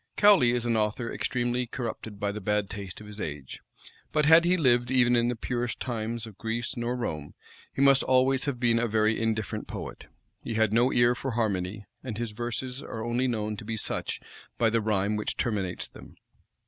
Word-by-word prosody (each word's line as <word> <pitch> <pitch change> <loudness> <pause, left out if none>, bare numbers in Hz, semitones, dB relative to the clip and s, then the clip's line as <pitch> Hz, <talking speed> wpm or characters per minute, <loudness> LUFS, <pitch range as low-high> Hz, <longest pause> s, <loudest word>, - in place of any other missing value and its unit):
Cowley 200 -12 +6
is 120 -1 -1
an 115 -1 +1
author 110 +2 -1
extremely 120 0 -1
corrupted 115 -4 -5
by 100 0 0
the 105 +1 -6
bad 105 0 0
taste 100 -3 -6
of 105 - -11
his 105 0 -10
age; 70 -3 -5 0.5
but 150 -1 +2
had 160 +2 +7
he 180 +1 +4
lived 120 -6 +3
even 125 -2 +4
in 120 0 +3
the 120 - 0
purest 120 +1 -2
times 115 -1 -3
of 110 -3 -12
Greece 115 +4 -2
nor 120 0 -2
Rome, 75 -12 -4 0.4
he 135 - 0
must 135 -1 +6
always 130 +1 +3
have 140 -4 -2
been 115 -1 +3
a 120 - +1
very 110 0 +2
indifferent 110 -3 -2
poet. - - -7 0.4
He 115 - -4
had 110 -1 +2
no 120 +3 +4
ear 120 0 +4
for 135 +2 -4
harmony; 105 -3 -1 0.2
and 120 -5 -5
his 120 -2 -3
verses 120 +4 -4
are 110 0 -6
only 120 +2 +1
known 110 -3 -2
to 110 - -8
be 110 +1 -4
such - - -3 0.4
by 115 -1 +3
the 115 0 +2
rhyme 105 -1 +1
which 105 - -3
terminates 100 -6 -1
them. - - -14
115 Hz, 200 wpm, -28 LUFS, 105-125 Hz, 0.5 s, had